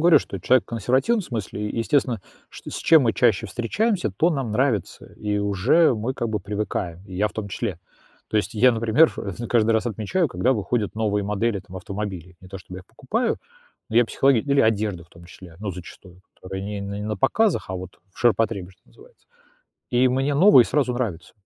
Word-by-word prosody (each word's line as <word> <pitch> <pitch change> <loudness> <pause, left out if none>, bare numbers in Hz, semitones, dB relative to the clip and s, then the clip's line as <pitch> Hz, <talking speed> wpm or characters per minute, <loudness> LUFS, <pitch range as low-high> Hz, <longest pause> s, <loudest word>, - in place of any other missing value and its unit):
говорю, 175 -1 +7
что 100 - -7
человек 130 +5 +3
в - - -47
консервативном 130 - +1
смысле, 105 - -4
естественно, 120 -2 0 0.3
что - - -10
с - - -5
чем 160 -4 +5
мы 115 -2 +2
чаще 115 -2 +2
встречаемся, 180 - -1
то 165 - +1
нам 135 -7 -2
нравится, 110 -3 -1
и 105 -1 -2
уже 100 - +3
мы 115 +5 -3
как 120 -3 -2
бы 105 -2 -2
привыкаем, 95 -3 -4
и 95 - -10
я 105 +3 +1
в - - -16
том 105 -2 -5
числе. 100 -4 -4 0.5
То - - -1
есть 105 - -1
я, 125 +3 +5
например 115 +8 +4
в 105 +4 -5
каждый 115 -2 +2
раз 110 +1 +1
отмечаю, 120 - -1
когда 130 - +1
выходят 105 -1 -2
новые 105 -2 0
модели 105 0 -1
там 95 - -12
автомобилей, 95 -3 -6
не 95 - -14
то, 95 0 -8
чтобы 90 0 -10
я - - -9
их 90 - -20
покупаю, 205 - -2 0.5
но 110 - -3
я 120 - +6
психологи 135 +2 +2
или 140 +2 +2
одежда 105 -5 0
в - - -28
том 85 0 -16
числе, 85 -2 -14
ну, 105 -2 -3
зачастую, 90 +1 -12
которая 95 +1 -7
не 100 0 -5
на 105 +2 -4
показах, 205 +8 +1
а - - -3
вот 90 0 -9
в - - -20
ширпотребе, 110 -5 +1
что 95 +1 -26
называется, 475 +3 -21 0.6
и 125 +1 +3
мне 135 +3 0
новые 150 - +7
сразу 135 -2 0
нравятся, 110 -9 -4
110 Hz, 200 wpm, -23 LUFS, 100-130 Hz, 0.6 s, говорю